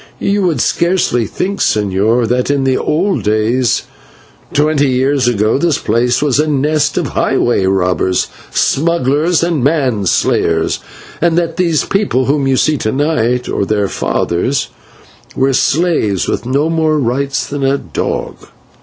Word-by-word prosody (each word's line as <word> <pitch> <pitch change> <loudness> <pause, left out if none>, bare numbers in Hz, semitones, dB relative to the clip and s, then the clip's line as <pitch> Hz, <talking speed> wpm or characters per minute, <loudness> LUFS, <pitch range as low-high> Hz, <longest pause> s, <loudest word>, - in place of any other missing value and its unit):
"You 200 +1 0
would 165 -9 0
scarcely 170 -10 +1
think, 200 +2 -3
señor, 105 +3 +1
that 125 +3 0
in 140 -1 +1
the 130 -1 +1
old 185 +9 0
days, 110 +3 +1 0.7
twenty 150 -1 +2
years 130 0 +1
ago, 110 +1 +1
this 165 -2 +1
place 120 +4 0
was 145 -2 +1
a 155 - +2
nest 150 0 0
of 170 -6 -1
highway 120 -7 +1
robbers, 90 -1 +1 0.2
smugglers, 160 +2 +1
and 170 -6 0
man 130 - +1
slayers, 80 -1 +1 0.4
and 170 0 +2
that 165 -1 -1
these 170 -4 +1
people 195 -10 0
whom 140 -1 +1
you 135 -1 +2
see 155 +2 +2
to 110 - -2
night, 125 -4 0
or - - -1
their 105 0 0
fathers, 95 +9 -1 0.7
were 135 +1 +1
slaves 135 - +1
with - - -3
no 140 +4 +1
more 160 -1 +1
rights 135 0 -1
than 145 -1 -4
a 135 +1 +2
dog. - - -5
135 Hz, 145 wpm, -14 LUFS, 120-155 Hz, 0.7 s, twenty